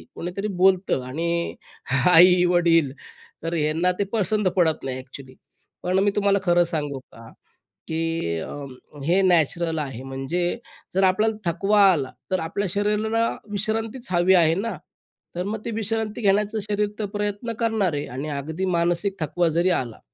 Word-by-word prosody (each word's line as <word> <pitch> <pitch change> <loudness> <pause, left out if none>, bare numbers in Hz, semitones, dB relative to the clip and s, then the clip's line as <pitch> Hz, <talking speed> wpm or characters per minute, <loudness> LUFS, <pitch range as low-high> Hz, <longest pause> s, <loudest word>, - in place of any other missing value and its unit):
कोणीतरी 180 +4 -4 0.2
बोलतं 190 -8 +3
आणि 170 +5 -2 0.6
आई-वडील 175 -3 +5 0.5
तर 165 +1 -3
ह्यांना 160 +3 +1
ते - - +3
पसंत 215 -1 +1
पडत 160 -3 +2
नाही 130 -1 -3
एक्चुअली. 130 0 -11 0.5
पण 185 +1 +1
मी 205 - +3
तुम्हाला 200 -1 +2
खरं 175 -2 +4
सांगू 145 -5 -3
का, 115 0 -13 0.6
की 165 - -2
अ, - - -6 0.5
हे 180 +5 +3
नॅचरल 170 -2 +2
आहे 135 -4 -5
म्हणजे 135 - -2 0.4
जर 190 - +3
आपल्याला 210 +4 +2 0.2
थकवा 200 +5 +2
आला 140 -7 -1 0.2
तर 185 - +1
आपल्या 190 +5 -2
शरीराला 215 +3 +1 0.2
विश्रांतीच 220 +4 -2
हवी 175 +1 +4
आहे 165 -2 +4
ना, 220 +5 -3 0.6
तर 180 - -2
मग 215 +1 -3
ते - - -2
विश्रांती 220 0 -2
घेण्याचा 205 +1 +2
शरीर 210 0 0
तर 215 - -1
प्रयत्न 205 +3 -2
करणार 220 -7 +1
आहे 145 0 -2
आणि 140 +4 -4
अगदी 155 +5 -3
मानसिक 175 +2 +1
थकवा 160 +3 0
जरी 170 +3 +2
आला, 125 -9 -2
180 Hz, 150 wpm, -23 LUFS, 160-205 Hz, 0.6 s, आई-वडील